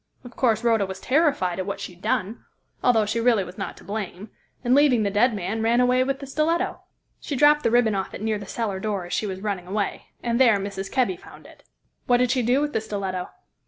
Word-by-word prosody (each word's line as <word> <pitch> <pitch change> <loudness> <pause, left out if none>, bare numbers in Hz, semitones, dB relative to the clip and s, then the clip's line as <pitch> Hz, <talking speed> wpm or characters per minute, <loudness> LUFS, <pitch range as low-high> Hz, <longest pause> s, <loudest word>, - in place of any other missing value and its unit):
Of 245 -1 -12
course, 230 -3 +1
Rhoda 225 -4 +2
was 190 0 -7
terrified 260 - +1
at 185 - -3
what 200 - -3
she 180 - -7
had 175 - -21
done 200 +5 -2 0.4
although 225 -4 +4
she 220 +3 -1
really 230 -4 +3
was 180 +2 -11
not 195 - -5
to - - -14
blame 205 -1 -6 0.3
and 245 0 +2
leaving 270 -5 +4
the 200 - 0
dead 220 +3 +3
man, 200 +3 -3
ran 230 +2 +3
away 250 +1 +4
with 270 +1 -1
the 275 - -8
stiletto. 330 +6 -1 0.4
She 285 - -4
dropped 295 +2 +5
the - - +2
ribbon 235 -2 +3
off 190 -1 -3
it - - -8
near 220 -1 0
the 200 - -9
cellar 205 -4 -3
door 200 -3 -2
as 175 - -7
she 215 - 0
was 190 -1 -5
running 195 -4 -3
away, 200 +1 -3 0.2
and 235 0 0
there 230 -5 +6
Mrs. 195 -1 -5
Kebby 265 +7 +1
found 400 +2 -15
it." - - -16 0.5
"What 245 - +5
did 250 -1 +2
she 260 - +2
do 245 +4 +2
with 295 0 -2
the 220 - 0
stiletto?" 195 -4 -4
220 Hz, 240 wpm, -24 LUFS, 195-250 Hz, 0.5 s, there